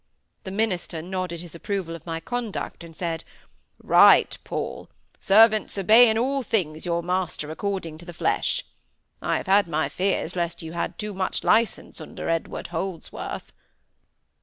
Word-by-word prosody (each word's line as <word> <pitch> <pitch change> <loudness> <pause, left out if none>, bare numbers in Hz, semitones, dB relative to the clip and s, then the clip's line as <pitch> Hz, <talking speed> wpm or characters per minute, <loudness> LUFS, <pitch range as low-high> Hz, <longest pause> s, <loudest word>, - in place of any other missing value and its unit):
The - - -4
minister 190 -5 -1
nodded 180 -2 -4
his 175 -2 -10
approval 175 -1 -3
of 165 - -12
my 165 0 -2
conduct, 230 -1 -4
and 165 -1 -12
said,—"Right, 165 -2 +2
Paul! - - -5 0.3
'Servants, 215 +1 +5
obey 220 +5 +7
in 220 - +1
all 270 +4 +1
things 175 -9 -1
your 170 0 0
master 175 -4 -2
according 170 -3 -3
to 175 - -12
the 175 - -7
flesh.' - - 0 0.6
I - - +1
have - - -5
had 200 0 +4
my 155 -1 0
fears 185 -2 -1
lest 170 -1 -2
you 160 - -6
had 170 - -3
too 210 -1 -4
much 190 -1 -2
licence 225 -6 +1
under 155 - -6
Edward 165 0 -2
Holdsworth." 170 0 -5
180 Hz, 150 wpm, -25 LUFS, 165-205 Hz, 0.6 s, obey